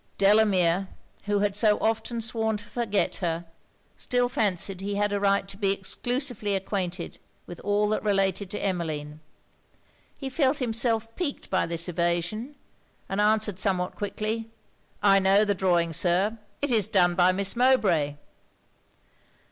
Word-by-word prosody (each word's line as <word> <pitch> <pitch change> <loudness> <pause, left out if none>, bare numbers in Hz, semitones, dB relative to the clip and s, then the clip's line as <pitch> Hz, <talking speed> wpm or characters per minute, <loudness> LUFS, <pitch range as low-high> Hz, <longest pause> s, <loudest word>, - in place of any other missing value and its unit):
Delamere, 195 -3 +3 0.4
who 205 -1 +1
had 205 -1 0
so 210 0 +3
often 225 +1 -1
sworn 220 -1 -1
to 205 - -10
forget 210 -2 -1
her, 170 -2 -2 0.5
still 245 0 +1
fancied 195 -4 -1
he 200 +1 -3
had 205 0 0
a 200 - 0
right 200 0 +2
to 195 0 -9
be 195 -2 +1
exclusively 220 +2 -2
acquainted 185 -2 -3 0.3
with 175 - -10
all 205 +1 +1
that 215 - 0
related 195 -2 0
to 210 - -4
Emmeline. 155 -5 -3 1.0
He 270 - -5
felt 265 +1 +1
himself 225 -2 -1
piqued 335 -6 -4
by 190 - +1
this 170 +1 -1
evasion, 175 - -1 0.5
and 195 +2 -1
answered 210 -2 +2
somewhat 185 -2 0
quickly 215 +2 -4 0.5
'I 195 -1 +6
know 195 +2 +4
the 205 - +1
drawing, 175 -3 +1
Sir; 190 +7 +1 0.2
it 285 - +1
is 215 -4 +3
done 180 -4 +3
by 180 +1 +4
Miss 195 +3 +1
Mowbray.' 205 - +3
200 Hz, 145 wpm, -26 LUFS, 185-220 Hz, 1.0 s, I